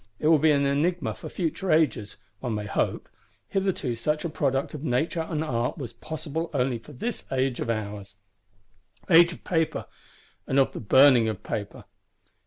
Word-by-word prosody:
It 155 - +1
will 160 -2 +6
be 155 +2 +4
an 140 -2 +3
enigma 155 +6 0
for - - -9
future 180 +2 -2
ages, 135 -10 +1 0.2
one 120 -4 -3
may 105 0 -3
hope: - - -1 0.4
hitherto 190 -10 -1
such 150 +8 -1
a - - -1
product 135 -3 -1
of 150 -1 -7
Nature 160 +5 0
and 155 -2 -1
Art 120 -3 -1
was 125 -6 -6
possible 160 +1 -5
only 125 -2 0
for 130 - -14
this 220 - -5
age 130 -1 0
of - - -3
ours,—Age 105 - -1
of - - -14
Paper, 160 -3 0 0.6
and 130 - 0
of 135 - +4
the - - -5
Burning 125 0 +6
of 105 -2 -5
Paper. 100 -1 -5
140 Hz, 170 wpm, -26 LUFS, 115-160 Hz, 0.6 s, will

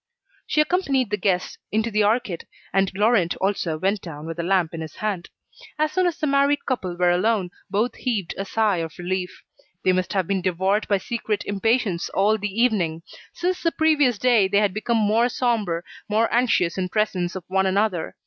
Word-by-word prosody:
She 305 - +3
accompanied 280 - +1
the 210 - +1
guests 185 -2 -1
into 220 +2 0
the 210 0 +2
arcade, 210 -4 0 0.3
and 195 0 +2
Laurent 205 -4 +2
also 190 -5 -1
went 195 +4 0
down 150 -3 -8
with 165 +1 -6
a - - +2
lamp 175 -2 +1
in 165 - -5
his 155 -2 -8
hand. 200 -5 -3 0.5
As 310 0 +1
soon 370 +2 +2
as 340 - -2
the 325 - -1
married 280 0 +2
couple 185 -9 -2
were 180 0 +3
alone, 185 0 +1 0.2
both 215 +5 0
heaved 215 -9 -2
a 195 - -3
sigh 210 -1 +1
of 165 -2 -5
relief. 180 0 -4 0.4
They 185 - +4
must 185 0 -1
have 190 -3 +1
been 195 +1 -1
devoured 190 +4 0
by 200 - +3
secret 215 0 -3
impatience 205 -3 0
all 210 +3 +2
the 210 +1 -2
evening. 170 -9 0 0.3
Since 360 +1 -2
the 335 - +1
previous 295 -7 +3
day 235 -4 +4
they 200 +1 +1
had 205 -2 +2
become 230 +3 0
more 220 +3 +3
sombre, 215 -10 0 0.3
more 220 +2 +1
anxious 225 -8 +2
in 180 -1 -1
presence 185 -4 -1
of 185 - -5
one 190 0 +1
another. 190 -3 0
205 Hz, 195 wpm, -23 LUFS, 180-235 Hz, 0.5 s, They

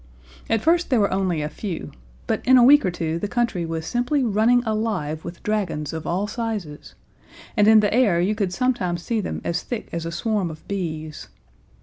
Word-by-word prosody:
At 225 -2 +2
first 345 +2 +2
there 250 - +3
were 200 -2 +2
only 185 -5 0
a - - -1
few, 170 +3 -6 0.3
but - - -1
in 260 0 +6
a 245 - +7
week 290 +3 +7
or 185 - +1
two 165 -1 -3
the 205 - -2
country 225 -7 -1
was 165 -1 -4
simply 245 - 0
running 235 +2 +3
alive 210 -9 -2
with 170 0 -9
dragons 185 -8 -2
of 160 -1 -5
all 185 +4 0
sizes, 210 - -5 0.6
and 210 -1 +4
in 220 -1 +7
the 205 -1 +1
air 220 -8 +3
you 185 +5 +1
could 200 -4 -1
sometimes 185 -7 -1
see 225 -2 -1
them - - -4
as 170 +1 -1
thick 240 -3 -6
as 170 -1 -3
a - - -4
swarm 200 +1 -1
of 155 -1 -11
bees. 155 -6 -5
200 Hz, 205 wpm, -23 LUFS, 170-230 Hz, 0.6 s, a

